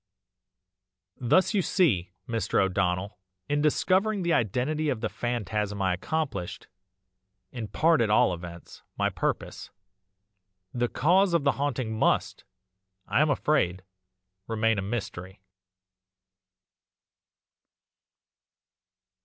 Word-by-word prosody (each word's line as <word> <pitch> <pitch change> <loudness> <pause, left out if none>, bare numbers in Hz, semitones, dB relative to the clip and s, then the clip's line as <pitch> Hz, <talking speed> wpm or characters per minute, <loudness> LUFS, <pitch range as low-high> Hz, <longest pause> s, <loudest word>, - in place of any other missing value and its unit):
"Thus 185 - +3
you 200 - +3
see, 110 - +1 0.2
Mr. 115 -5 0
O'Donnell, 95 0 0 0.3
in 145 0 0
discovering 190 +6 +2
the 170 -1 +1
identity 130 +8 0
of 130 -5 -1
the - - -1
phantasm 105 -4 -2
I 95 -1 +1
accomplished 100 - -3 0.9
in 115 -4 -5
part 165 +6 +3
at 110 - +2
all 105 -3 +4
events 85 0 -10 0.2
my - - +1
purpose; - - -3 1.0
the 120 0 0
cause 180 +5 +3
of 165 - +2
the 140 - +4
haunting 125 -6 -2
must, - - +1 0.6
I - - +2
am 150 - +3
afraid, 95 -11 +1 0.6
remain 115 -1 +1
a - - -1
mystery." 95 -3 -5
120 Hz, 105 wpm, -27 LUFS, 95-155 Hz, 1.0 s, all